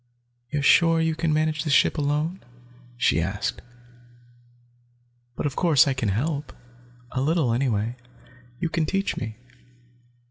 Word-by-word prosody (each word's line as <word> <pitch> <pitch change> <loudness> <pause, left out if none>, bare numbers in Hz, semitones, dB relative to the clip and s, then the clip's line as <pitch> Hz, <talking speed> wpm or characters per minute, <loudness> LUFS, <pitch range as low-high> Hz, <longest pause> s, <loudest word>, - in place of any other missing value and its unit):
"You're 145 +1 -2
sure 165 +3 +5
you 160 0 +1
can 160 0 -1
manage 155 0 0
the 155 - -3
ship 140 - +4
alone?" 150 +5 -1 0.5
she 80 - +2
asked. 95 +5 -3 1.7
"But - - -4
of 140 -2 -2
course, 160 -3 +4
I 135 - +2
can 125 -5 -1
help, 140 +9 -2 0.6
a 130 - -2
little 150 -4 +1
anyway. 120 -2 -1 0.6
You - - 0
can 160 -1 -1
teach 195 +3 -1
me." 110 -2 -5
150 Hz, 135 wpm, -24 LUFS, 125-160 Hz, 1.7 s, sure